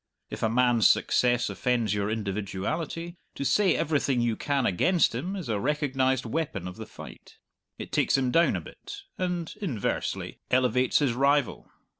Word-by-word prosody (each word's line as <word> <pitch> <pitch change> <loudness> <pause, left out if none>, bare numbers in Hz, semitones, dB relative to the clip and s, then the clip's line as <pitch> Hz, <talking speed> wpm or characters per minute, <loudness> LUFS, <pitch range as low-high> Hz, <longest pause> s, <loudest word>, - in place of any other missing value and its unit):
If - - -6
a 110 - +2
man's 120 -3 +4
success 120 -1 +2
offends 120 -5 0
your 100 0 -1
individuality, 110 - -3 0.2
to 140 - -4
say 200 +6 +3
everything 140 -4 +1
you 120 -2 +1
can 140 0 -1
against 170 - +2
him 170 +12 -3
is 180 -8 -5
a 110 -3 -1
recognized 130 -1 0
weapon 115 - -3
of 90 - -8
the - - -8
fight. - - -12 0.4
It - - -8
takes - - +2
him 130 -2 0
down 165 +6 +3
a - - -3
bit, 400 0 -11 0.2
and 175 -2 -2
(inversely) 130 - -3
elevates 125 0 +2
his 140 -5 +2
rival. 140 +1 +1
130 Hz, 160 wpm, -27 LUFS, 115-155 Hz, 0.4 s, man's